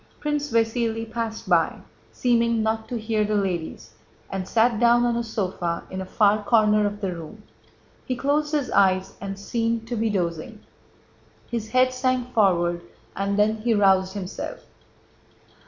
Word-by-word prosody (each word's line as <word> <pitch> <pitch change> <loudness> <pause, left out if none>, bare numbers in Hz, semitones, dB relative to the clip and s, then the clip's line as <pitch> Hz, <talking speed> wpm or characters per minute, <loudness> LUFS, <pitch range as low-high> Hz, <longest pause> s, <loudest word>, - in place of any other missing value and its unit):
Prince 295 -1 -2
Vasíli 225 0 0
passed 225 0 -5
by, - - +3 0.4
seeming 235 -2 +1
not 220 0 -2
to 245 - -2
hear 215 -1 0
the 210 0 -1
ladies, 175 - -3 0.4
and 190 -1 -3
sat 230 0 +2
down 240 0 +4
on 240 -1 +1
a 235 - -1
sofa 185 -6 -3
in 190 0 -4
a 190 - -6
far 210 +1 +3
corner 210 -1 +3
of 205 +1 -6
the 190 -3 -2
room. 170 +6 -10 0.6
He 255 - -1
closed 295 +4 0
his 295 -4 -1
eyes 190 -1 +3
and 195 0 -5
seemed 230 +2 -2
to 245 - -2
be 225 0 0
dozing. 180 +2 -3 0.9
His 225 -2 -3
head 255 +1 +3
sank 255 -1 -1
forward 175 -5 +2 0.3
and 200 +1 -1
then 215 +1 +3
he 225 +1 +1
roused 190 -2 +3
himself. 190 -2 -6
220 Hz, 155 wpm, -24 LUFS, 195-235 Hz, 0.9 s, down